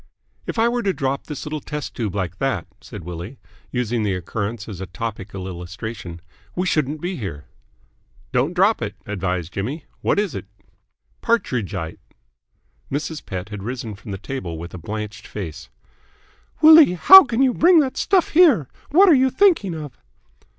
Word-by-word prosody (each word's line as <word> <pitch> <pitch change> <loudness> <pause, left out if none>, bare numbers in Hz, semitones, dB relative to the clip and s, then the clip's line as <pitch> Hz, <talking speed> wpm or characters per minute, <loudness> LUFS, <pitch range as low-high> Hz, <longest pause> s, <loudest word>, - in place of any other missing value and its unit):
"If - - -4
I 225 +1 +4
were 240 0 0
to 195 -4 0
drop 135 -3 -2
this 150 -3 -6
little 155 0 -4
tube 125 -9 -5
like 95 -2 -3
that," 135 -11 -1 0.2
said - - -10
Willie, 90 - -7 0.3
using 120 -2 -1
the 100 -3 0
occurrence 105 +5 -4
as 100 -5 -7
a 95 - -5
topical 95 -1 -6
illustration, 90 0 -7 0.3
"we 180 - -1
shouldn't 155 -3 0
be 180 +1 -3
here." 80 - -6 0.9
"Don't 145 +8 0
drop 195 +5 +3
it," - - -4
advised 90 -4 -3
Jimmy. 130 +11 -4 0.2
"What - - +1
is 205 -7 0
it?" - - -6 0.8
"Partridgite!" 115 - -1 0.9
Mrs. 150 +2 -3
Pett 95 +2 -6
had 105 -2 -7
risen 115 0 -5
from 105 +3 -12
the 100 - -4
table, 95 -6 -6
with 85 +2 -8
blanched 105 +3 -6
face. 90 -7 -7 0.9
"Willie, 315 - +9
how 385 - +10
can 240 0 0
you 260 -2 +3
bring 340 +4 +5
that 265 -3 -2
stuff 380 -3 +2
here? 300 - +5 0.2
What 375 +7 +6
are 345 - +7
you 265 -1 +4
thinking 320 - +3
of?" 150 -5 -8
125 Hz, 160 wpm, -21 LUFS, -, 0.9 s, how